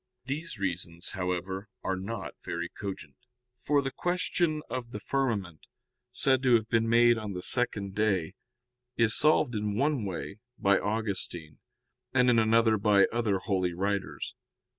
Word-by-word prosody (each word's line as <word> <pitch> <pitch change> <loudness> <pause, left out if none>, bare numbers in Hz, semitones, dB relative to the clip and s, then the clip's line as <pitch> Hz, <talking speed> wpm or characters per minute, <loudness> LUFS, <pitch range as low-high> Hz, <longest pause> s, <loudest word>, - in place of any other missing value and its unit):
These 150 +2 -4
reasons, 85 -3 -3
however, 95 +2 -3
are 95 - 0
not 100 +5 -5
very 85 0 -3
cogent. 100 -2 -7 0.5
For 145 -1 +2
the 135 - -2
question 175 -2 -1
of 125 -2 -4
the 105 - -6
firmament, 105 - -2 0.4
said 130 +1 +2
to 125 -3 +5
have 110 -1 +1
been 115 -1 +1
made 120 0 +5
on 105 -2 -5
the 90 -1 -5
second 100 -4 0
day, 95 -5 0 0.6
is 115 -1 +3
solved 150 -5 +3
in 105 -1 -1
one 140 -2 +1
way 95 +2 -5 0.2
by 100 0 +3
Augustine, 100 -7 -3 0.6
and 125 -1 +5
in 115 - +4
another 110 0 +4
by 100 -1 +5
other 115 -4 +1
holy 95 -3 -1
writers. 100 +1 -2
110 Hz, 145 wpm, -29 LUFS, 95-120 Hz, 0.6 s, to